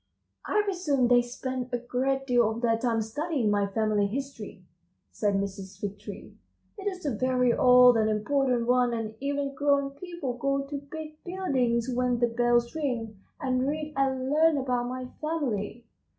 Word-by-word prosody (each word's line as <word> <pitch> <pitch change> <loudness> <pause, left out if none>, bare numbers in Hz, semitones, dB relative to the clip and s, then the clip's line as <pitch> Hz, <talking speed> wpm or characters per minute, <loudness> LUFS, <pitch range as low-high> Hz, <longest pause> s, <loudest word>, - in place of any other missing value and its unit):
"I 420 - +2
presume 300 -10 +1
they 245 0 +6
spend 255 +1 -5
a 245 - +1
great 260 +3 -1
deal 245 -4 +3
of 225 +1 -4
their 230 -1 +3
time 230 -1 0
studying 260 0 -1
my 205 -1 +2
family 210 0 +1
history," 275 +6 -6 0.5
said 205 -2 0
Mrs. 195 -1 -4
Fig 205 0 -5
Tree. 205 -1 -10 0.4
"It 395 - -4
is 370 -4 -4
a 280 - 0
very 250 +1 +2
old 250 -1 +7
and 220 -1 +2
important 245 +3 +1
one, 245 -1 +3
and 220 -1 -4
even 280 0 -2
grown 280 0 +1
people 285 -5 -6
go 275 +1 0
to 280 0 -5
big 310 -1 -8
buildings 260 -11 0
when 250 0 +1
the 240 - +3
bells 240 0 +2
ring, 240 -9 -3 0.2
and 255 -3 0
read 305 +1 -3
and 265 -1 0
learn 315 0 +4
about 250 -2 -1
my 255 0 -4 0.2
family." 245 -8 -2
250 Hz, 165 wpm, -28 LUFS, 230-280 Hz, 0.5 s, old